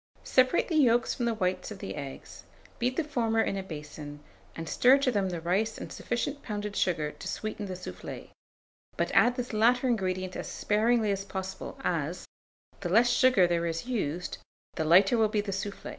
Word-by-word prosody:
Separate 255 +5 +3
the 325 - 0
yolks 240 -4 +4
from 240 - -2
the 230 -1 0
whites 185 -3 -1
of 210 - -7
the - - -6
eggs, 140 -2 -8 0.4
beat 250 +2 0
the 330 - +2
former 230 -6 0
in 210 - +1
a 195 - -2
basin, 150 -4 -8 0.4
and 165 0 -6
stir 255 - +5
to 275 -2 +1
them 200 -4 0
the 175 -2 -3
rice 195 +7 0
and - - -7
sufficient 280 +4 -3
pounded 210 -1 -4
sugar 155 -5 0
to - - -9
sweeten 215 -1 -4
the 185 - -5
soufflé; 180 - -8 0.7
but - - 0
add 245 +1 +4
this 250 -2 -4
latter 245 +4 +3
ingredient 185 -5 -1
as - - -5
sparingly 220 +1 +1
as 195 0 -2
possible, 190 -1 -6
as, - - -2 0.5
the 180 - -3
less 235 +6 +5
sugar 255 -9 +5
there 170 -1 0
is 165 +3 -3
used, 180 - -3 0.3
the - - -2
lighter 190 +8 +5
will 220 - +5
be 210 0 0
the 205 -1 -2
soufflé. 200 +1 -5
205 Hz, 190 wpm, -29 LUFS, 180-240 Hz, 0.7 s, stir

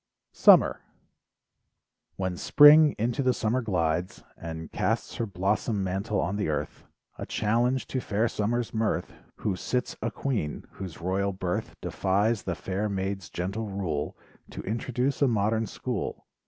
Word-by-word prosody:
SUMMER - - +6 1.3
When 95 -1 -2
spring 150 - +7
into 120 +4 0
the 130 -2 +2
summer 120 +3 0
glides 90 -5 -1
And 80 -1 -7
casts - - -1
her 115 - -1
blossom 100 +2 0
mantle 95 +3 -1
on 95 +3 -1
the 105 -6 -1
earth, 75 - -3 0.3
A - - -5
challenge 120 +4 +1
to 130 - -1
fair 110 +1 0
Summer's 115 +2 -1
mirth, 110 -1 -1 0.2
Who 100 - -2
sits 125 +7 -2
a 115 - 0
queen, 110 - -3
whose 90 -4 -8
royal 95 +3 0
birth 90 -1 -3
Defies 100 +3 +1
the 90 - -3
fair 95 +5 -2
maids 95 -3 -3
gentle 100 +5 -3
rule, 90 -7 -3 0.3
To - - -7
introduce 125 +6 -1
a 140 - +5
modern 110 -1 +1
school. - - -4
105 Hz, 140 wpm, -27 LUFS, 95-115 Hz, 1.3 s, spring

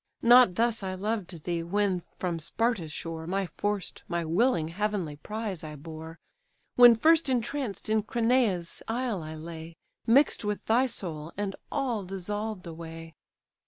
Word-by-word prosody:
Not 240 -5 +7
thus 230 -1 +1
I 190 -1 -3
loved 190 -5 -3
thee, 170 -1 -1
when 190 +1 0 0.2
from 175 -3 -2
Sparta's 195 0 -1
shore 160 +1 -5
My 195 +2 0
forced, 205 +1 -3
my 170 -1 -1
willing 170 -1 +2
heavenly 190 -5 -2
prize 210 0 -5
I 155 -1 -7
bore, 160 +2 -9 0.6
When 245 -1 +9
first 320 +4 +4
entranced 245 -4 -2
in 215 0 +2
Cranae's 225 -6 +1
isle 235 -4 -1
I 155 0 -7
lay, 165 +1 -8 0.3
Mix'd 265 +3 +4
with 210 0 -3
thy 245 +4 +3
soul, 165 -8 -4
and 205 -1 -2 0.2
all 250 -7 -1
dissolved 195 +2 -4
away!" 165 0 -8
195 Hz, 145 wpm, -28 LUFS, 165-225 Hz, 0.6 s, When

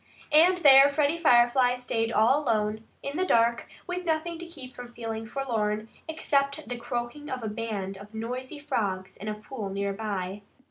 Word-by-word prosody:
And 340 +5 +6
there 280 -4 +8
Freddie 295 +3 +1
Firefly 245 -3 +4
stayed 230 -2 -1
all 245 +8 +4
alone, 220 -3 0 0.2
in 280 +2 -4
the 370 - +1
dark, 235 -8 +2 0.2
with 360 0 -4
nothing 325 0 -1
to 345 - -7
keep 265 -7 -10
from 245 -1 -9
feeling 225 -1 -5
forlorn 220 -4 -2 0.2
except 285 -2 0
the 245 - -3
croaking 240 +5 -5
of 255 -3 -4
a - - -2
band 210 -3 -4
of 205 +1 -12
noisy 250 +6 -5
frogs 195 -9 -2
in 210 - -9
a 215 - -2
pool 210 -1 -6
near 200 +1 -2
by. 200 -2 -4
240 Hz, 175 wpm, -27 LUFS, 215-285 Hz, 0.2 s, there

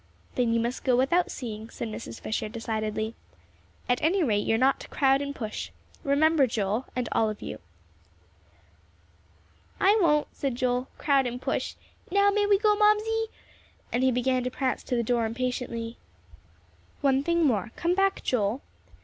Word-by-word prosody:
"Then 245 -2 +1
you 230 - +2
must 235 +2 -2
go 255 -2 +3
without 340 +8 +2
seeing," 220 -3 -6
said 235 - -5
Mrs. 115 - -7
Fisher, 215 0 -3
decidedly. 220 -1 -3 0.7
"At 245 0 +1
any 350 +4 +2
rate, 210 -7 +1
you 225 - +3
are - - +2
not 265 +3 +3
to - - -9
crowd 270 -1 +2
and 280 0 -4
push. 215 -3 -5 0.3
Remember, 290 0 +4
Joel, 220 +1 -1
and 250 -2 -1
all 220 - +2
of 215 - -6
you." 110 - -6 2.2
"I 400 +2 +5
won't," 300 -4 +3
said 275 -4 -2
Joel, 250 +1 0
"crowd 275 -3 +2
and 245 +1 -4
push. - - -2 0.3
Now 400 +2 +4
may 410 0 +2
we 405 -1 +5
go, 420 +1 +3
Mamsie?" 430 +2 +3 0.7
and 240 - +1
he 260 0 +4
began 255 +1 +1
to 250 - -1
prance 255 0 -1
to 250 - -1
the 235 - +1
door 235 0 +1
impatiently. 235 -1 -3 1.0
"One 275 -1 +3
thing 340 +2 +2
more. 215 -8 +1
Come 345 +1 +1
back, 390 +1 +1
Joel." 230 +1 0
255 Hz, 165 wpm, -27 LUFS, 230-310 Hz, 2.2 s, I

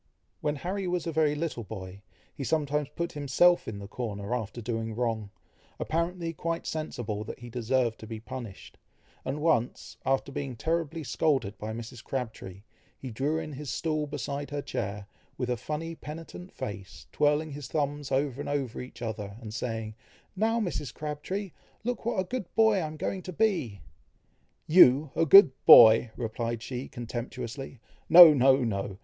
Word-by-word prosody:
When 150 -1 -1
Harry 185 +5 -3
was 180 -1 -1
a 165 - -2
very 155 -2 +2
little 150 -6 -3
boy, 95 0 -8 0.3
he 140 - -6
sometimes 150 -1 0
put 170 0 -2
himself 150 +4 +3
in 110 - -5
the 100 0 -8
corner, 105 -1 -4
after 120 -1 -3
doing 115 -1 -3
wrong, 115 -3 -2 0.5
apparently 170 +1 -2
quite 165 +1 -3
sensible 120 -9 -4
that - - -7
he 120 -1 -10
deserved 120 0 0
to 110 - -10
be 110 0 -6
punished, 120 -3 -9 0.4
and 150 - -3
once, 150 -7 0
after 135 +1 0
being 135 -2 -4
terribly 160 +3 -2
scolded 130 -3 0
by 110 +1 -4
Mrs. 115 +1 -8
Crabtree, 110 -7 -5 0.3
he 130 - -7
drew 140 +8 -1
in 155 -2 -5
his 145 0 -7
stool 155 -2 -1
beside 145 0 -4
her 145 -1 -4
chair, 100 +1 -4 0.3
with 125 -1 -2
a - - +1
funny 155 +7 -4
penitent 165 +3 -9
face, 95 -5 -7
twirling 150 +1 +1
his 145 -3 -7
thumbs 145 0 -2
over 135 0 0
and - - -5
over 140 -5 -2
each 125 -1 -10
other, 105 -2 -5
and 110 -3 -8
saying, 110 -1 -4 0.4
"Now, 225 +4 +1
Mrs. 175 - -3
Crabtree! 155 +8 -5 0.3
look 245 -1 -3
what 235 -4 0
a - - +2
good 235 +2 -4
boy 220 -2 +5
I 170 -4 -1
am 155 0 -8
going 190 +4 -3
to 185 - -7
be!" 170 - 0 0.8
"You 150 -3 +6
a 165 - +2
good 185 -2 +9 0.2
boy!" 115 0 +9
replied 115 0 -3
she 125 0 -5
contemptuously: 120 +2 -6 0.3
"No! 165 -1 +11
no! 120 -8 +2
135 Hz, 165 wpm, -28 LUFS, 115-160 Hz, 0.8 s, No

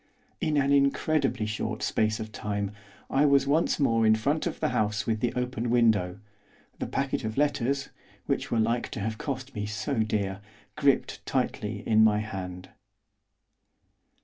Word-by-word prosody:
In 155 -4 0
an 140 0 +2
incredibly 140 -3 +2
short 110 -1 -3
space 110 0 +1
of 110 0 -6
time 100 -1 -3 0.4
I 140 - +2
was 140 -1 +4
once 155 +5 +2
more 115 -5 +3
in 110 0 +5
front 145 +8 0
of - - -4
the - - +1
house 110 -4 0
with 110 -1 0
the 120 +1 0
open 125 -1 -2
window, 110 -6 +2 0.6
the - - -2
packet 135 -2 -1
of 110 +1 -4
letters 140 -1 +1 0.4
which - - -1
were 115 - 0
like 115 +2 +1
to - - -4
have 110 +2 -3
cost 135 -1 -4
me 105 0 -3
so 105 +5 -2
dear! 100 -3 -1 0.3
gripped 140 -2 +1
tightly 115 -5 -2
in 110 0 +5
my 105 -1 +5
hand. 95 -3 -5
115 Hz, 160 wpm, -28 LUFS, 105-140 Hz, 0.6 s, in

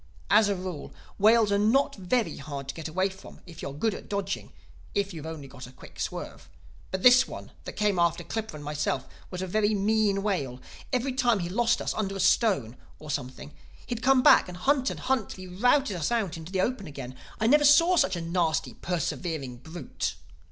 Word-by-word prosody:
As 210 0 +6
a 200 - +1
rule, 180 -5 -6 0.3
whales 220 +1 +5
are 200 - +3
not 230 +7 +3
very 215 +5 -1
hard 140 -1 -7
to - - -4
get 165 -1 -6
away 185 +4 0
from 190 0 -12
if 170 -3 -11
you - - -4
are - - -6
good 195 +10 -1
at - - -9
dodging—if 200 0 -4
you've 160 -1 -7
only 155 -4 -7
got 130 -1 -10
a - - -13
quick - - -15
swerve. - - -5 0.4
But 190 0 -4
this 250 +1 +7
one - - -9
that - - -6
came 205 -4 +1
after 170 -1 +2
Clippa 220 -6 -5
and 150 - -8
myself 145 -2 -2 0.2
was 180 0 -5
a - - -1
very 210 +3 +1
mean 205 -1 +1
whale. 140 -12 -2 0.3
Every 255 +1 0
time 245 -3 +2
he 175 -2 -3
lost 235 +4 +1
us - - -1
under 195 -2 -2
a - - -5
stone 185 - +2 0.2
or 155 0 -7
something 125 - -5 0.3
he'd 235 -1 -4
come 260 0 +4
back - - +7
and 180 -1 -8
hunt 270 +6 +2
and - - -6
hunt 260 -5 0
till 185 -1 -8
he 180 - -11
routed 245 +1 +3
us 170 +2 -2
out 220 -7 0
into 165 +2 -9
the 190 -1 +1
open 225 -3 -2
again. 135 -3 -8 0.2
I 220 - 0
never 295 +6 +5
saw 330 +5 +6
such 190 - +3
a 170 - -4
nasty, 165 -1 0
persevering 160 -6 -3
brute. 160 +2 -5
190 Hz, 210 wpm, -27 LUFS, 160-220 Hz, 0.4 s, this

